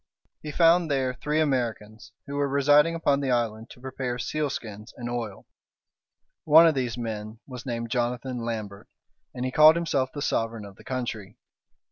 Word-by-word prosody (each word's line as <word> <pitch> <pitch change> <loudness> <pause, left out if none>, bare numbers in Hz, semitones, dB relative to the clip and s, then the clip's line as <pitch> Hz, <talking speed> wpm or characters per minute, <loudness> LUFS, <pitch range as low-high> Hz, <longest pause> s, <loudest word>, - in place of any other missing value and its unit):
He 150 - -6
found 165 +1 +4
there 130 -2 0
three 150 +4 -2
Americans, 115 -7 -2
who 140 - -7
were 145 0 0
residing 145 +4 +4
upon 145 -4 +1
the 140 -2 -2
island 115 -2 -1
to - - -14
prepare 130 -1 -4
sealskins 120 -7 -4
and 120 - -6
oil. 115 -5 -5 1.0
One 160 +2 +7
of 165 - +5
these 125 -4 -2
men 110 -2 -5
was 125 -2 -9
named 115 -1 -4
Jonathan 125 +1 -2
Lambert, 105 -3 -5 0.5
and 125 - -3
he 130 - -2
called 155 +3 +7
himself 140 -6 0
the 145 - -5
sovereign 115 -2 -2
of 100 -1 -13
the - - -15
country. 120 -6 -5
125 Hz, 165 wpm, -26 LUFS, 115-145 Hz, 1.0 s, One